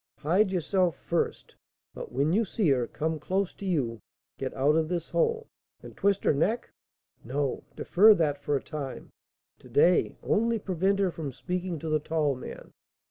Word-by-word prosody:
Hide 185 +7 +2
yourself 180 -1 +1
first; 170 - -2 0.4
but, - - -8
when 140 +6 +1
you 220 +4 +3
see 200 -3 0
her 125 -4 +2
come 160 +4 -2
close 190 +5 -1
to 200 - -7
you, 125 -11 0 0.4
get 130 - -3
out 140 +3 +3
of 160 -1 +1
this 175 -2 -3
hole 460 -1 +1 0.2
" - - -40
"And - - -11
twist 200 -1 +1
her - - +3
neck?" 210 +12 0 0.5
"No, 135 +2 -2
defer 210 +4 +6
that 150 -5 0
for 145 0 -1
a 135 - -2
time. 145 -4 -6 0.5
To - - -16
day, 175 +5 +3
only 230 +2 +2
prevent 190 -1 0
her 195 -2 +1
from 155 -4 -5
speaking 180 +5 -3
to 160 +2 -5
the 155 0 +2
tall 150 -1 0
man. 130 - -9
165 Hz, 180 wpm, -28 LUFS, 145-195 Hz, 0.5 s, defer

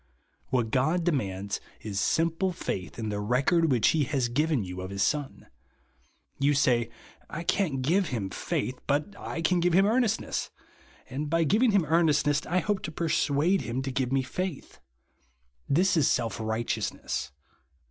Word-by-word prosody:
Who 125 -2 +2
t 110 - -7
God 155 +8 +2
demands 100 - -1 0.2
is 100 -3 -3
simple 165 - +1
faith 95 - -5
in 110 -2 -3
the 105 -1 -2
record 135 +9 +2
which 120 -4 +4
he 155 -3 +2
has 125 -2 0
given 150 -1 +1
you 90 0 -6
of 95 - -6
his 100 0 -1
Son. 145 -2 -2 0.9
You 140 +1 +3
say, 120 -4 +2 0.4
I 165 - -5
can't 160 -8 0
give 180 +6 +2
him 105 -8 -3
faith, 135 - -3
but 150 +8 0
I 165 -3 -5
can 180 +2 +3
give 175 0 +2
him 190 +3 +5
earnestness; 225 0 0 0.6
and 145 +3 -4
by 165 +1 +2
giving 220 - +3
him 200 -4 +3
ertrnest 155 -1 +3
ness, 145 0 +2
I 180 +2 +1
hope 205 -2 -1
to 160 - -5
persuade 160 +2 +1
him 125 +2 -3
to 135 - -3
give 130 -1 -1
me 135 -1 +2
faith. 180 +3 -5 0.9
This 180 +7 +3
is 155 -6 +3
self 115 -3 0
righteousness. 110 - -2
145 Hz, 170 wpm, -28 LUFS, 120-170 Hz, 0.9 s, him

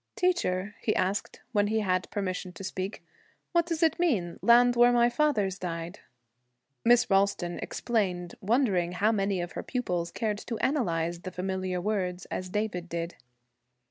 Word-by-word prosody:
'Teacher,' 210 - 0
he 215 - +1
asked, 190 +2 -1
when 205 -3 +2
he 220 +1 +1
had 185 -2 0
permission 185 -2 -3
to 180 +2 -10
speak, 190 +1 -4 0.5
'what 340 -1 +2
does 330 -1 -1
it 325 0 +3
mean, 215 - 0
"Land 245 +1 +6
where 240 0 +6
my 240 0 +4
fathers 215 -9 +1
died"?' 170 +1 -5 0.8
Miss 240 +1 +5
Ralston 195 -3 +1
explained, 185 -7 -1
wondering 195 -6 +2
how 205 +4 +2
many 195 -3 0
of 175 - -5
her - - -5
pupils 180 -9 -2
cared 210 +2 -2
to 230 0 -5
analyze 170 - 0
the 185 - -6
familiar 185 0 -2
words 185 -2 -2
as 185 0 -3
David 180 -4 -2
did. 170 +1 -4
195 Hz, 155 wpm, -28 LUFS, 180-235 Hz, 0.8 s, Land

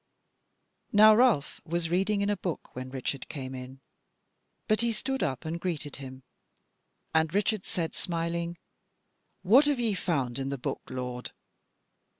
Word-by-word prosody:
Now 215 +1 +8
Ralph 230 - +3
was 170 0 -2
reading 195 +3 +2
in 200 +1 +2
a - - +2
book 180 -3 -5
when 130 +1 -5
Richard 130 0 -4
came 135 -3 -5
in, 130 +1 -8 0.9
but 215 +1 +3
he 235 0 +2
stood 265 +5 -2
up 130 0 -1
and 165 +2 -3
greeted 155 -5 -3
him; 130 -1 -9 0.9
and 160 -1 +3
Richard 205 0 +1
said 170 -6 -2
smiling: 170 0 -2 0.9
"What 240 +10 +7
have 290 -3 +2
ye 230 -3 +2
found 140 -9 -1
in 135 0 -2
the 140 - -2
book, 125 - -3
lord?" 125 -1 -5
170 Hz, 150 wpm, -29 LUFS, 135-205 Hz, 0.9 s, Now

